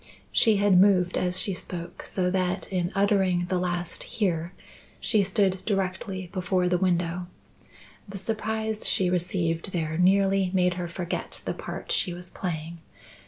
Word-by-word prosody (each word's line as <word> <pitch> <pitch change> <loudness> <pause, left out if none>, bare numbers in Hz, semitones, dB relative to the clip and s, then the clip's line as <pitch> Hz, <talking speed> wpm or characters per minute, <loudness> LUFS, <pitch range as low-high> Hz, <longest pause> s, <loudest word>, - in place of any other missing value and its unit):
She 220 -2 +5
had 195 -2 +5
moved 185 -3 +4
as 180 0 0
she 195 - -2
spoke, 175 -1 -7
so 180 -1 0
that 185 0 0
in 180 0 0
uttering 195 -3 +2
the 185 - +1
last 175 -1 -2
"here," 175 -7 -1 0.5
she 215 - +2
stood 190 -1 +1
directly 190 -2 -2
before 180 -1 +1
the 180 0 +2
window. 175 -1 0 0.8
The 195 - -6
surprise 220 +1 -2
she 180 -2 +1
received 175 0 -1
there 160 -1 -1
nearly 195 +1 +4
made 180 -1 +3
her 175 -1 -4
forget 175 0 -4
the - - -1
part - - -6
she 175 - 0
was 180 0 -9
playing. 165 -2 -4
180 Hz, 150 wpm, -26 LUFS, 175-195 Hz, 0.8 s, She